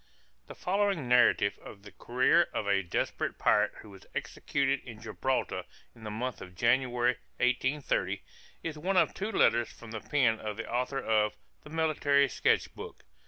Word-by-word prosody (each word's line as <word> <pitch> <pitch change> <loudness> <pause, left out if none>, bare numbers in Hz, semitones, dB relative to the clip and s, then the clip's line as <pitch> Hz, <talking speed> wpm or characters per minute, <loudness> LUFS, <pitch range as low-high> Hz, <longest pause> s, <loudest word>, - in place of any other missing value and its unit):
The - - -9
following 195 -6 0
narrative 120 -4 +4
of 100 -1 -11
the 105 - -12
career 130 +8 +2
of - - -1
a 100 -1 +3
desperate 85 - -2
pirate 105 0 +3
who 105 - -13
was 95 -1 -14
executed 140 -1 -1
in 115 -3 -10
Gibraltar 130 +3 -2 0.3
in 115 -2 -14
the - - -4
month 120 +4 -4
of 90 0 -10
January, 120 +2 +2 0.2
1830, 130 +3 0 0.4
is 155 -2 -4
one 185 +4 0
of - - +4
two 210 +3 -3
letters 120 - +3
from 115 -2 -12
the 110 -2 -5
pen 125 -6 +2
of 105 -1 -5
the 115 - -5
author 125 +3 -1
of 105 -3 +1 0.3
"the - - -13
Military 150 -3 +2
Sketch - - +1
Book." - - -10
125 Hz, 165 wpm, -30 LUFS, 110-140 Hz, 0.4 s, narrative